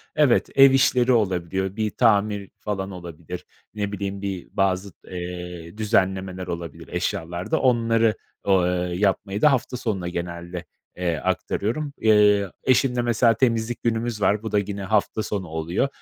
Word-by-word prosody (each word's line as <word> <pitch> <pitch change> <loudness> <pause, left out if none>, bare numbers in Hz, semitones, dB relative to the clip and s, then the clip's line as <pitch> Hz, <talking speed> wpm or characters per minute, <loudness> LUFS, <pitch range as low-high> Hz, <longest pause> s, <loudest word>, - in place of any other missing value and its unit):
evet, 145 -6 +3
ev 135 0 +8
işleri 130 -1 +3
olabiliyor, 95 -3 0
bir 110 -1 0
tamir 105 -3 +2
falan 100 -2 -3
olabilir, 85 -1 -8 0.3
ne 105 -1 -3
bileyim, 100 -1 -4
bir 95 -3 -4
bazı, 95 0 0 0.2
eee, 90 0 -7
düzenlemeler 95 -4 0
olabilir 85 -3 -6
eşyalarda. 85 - -2
Onları 115 -3 +3 0.3
o 95 -1 +4
ııı, 90 0 0
yapmayı 100 +1 0
da 150 - +6
hafta 125 -1 -1
sonuna 105 -8 -2
genelde, 85 0 -5 0.3
eee, 85 -2 0
aktarıyorum. 140 - -2
Eee, 105 -3 +4
eşimle, 125 -1 +3
mesela, 120 0 +3
temizlik 115 -1 0
günümüz 115 -1 -1
var, 105 +2 +2
bu 110 - -4
da 105 - +3
gine 100 0 -4
hafta 110 +2 +1
sonu 100 -3 -3
oluyor. 80 - -1
100 Hz, 140 wpm, -24 LUFS, 90-115 Hz, 0.3 s, ev